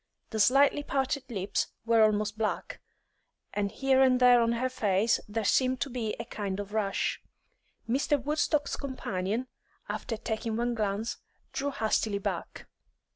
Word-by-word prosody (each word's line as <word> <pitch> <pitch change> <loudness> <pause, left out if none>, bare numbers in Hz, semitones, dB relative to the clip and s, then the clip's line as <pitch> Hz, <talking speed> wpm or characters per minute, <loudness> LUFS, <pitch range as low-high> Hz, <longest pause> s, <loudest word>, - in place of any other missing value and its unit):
The 220 - -2
slightly 275 +6 +5
parted 270 -1 -1
lips 195 -4 -1 0.2
were 230 -1 +4
almost 215 0 +2
black, 220 -1 -3 0.7
and 200 -1 -1
here 265 +1 +2
and 255 -1 +5
there 245 -1 +7
on 230 0 +2
her 245 +2 0
face 215 -3 +1
there 215 0 -2
seemed 255 +4 +2
to 275 - -1
be 230 -4 -2
a 230 - -4
kind 200 -4 -4
of 205 0 -6
rash. 205 -3 0 0.7
Mr. 280 +5 +1
Woodstock's 295 +2 0
companion, 225 -4 -3 0.4
after 225 - -3
taking 220 0 -3
one 240 +1 0
glance, 215 0 -2 0.4
drew 280 +1 -1
hastily 220 -4 0
back. 200 - -4
230 Hz, 145 wpm, -29 LUFS, 210-260 Hz, 0.7 s, there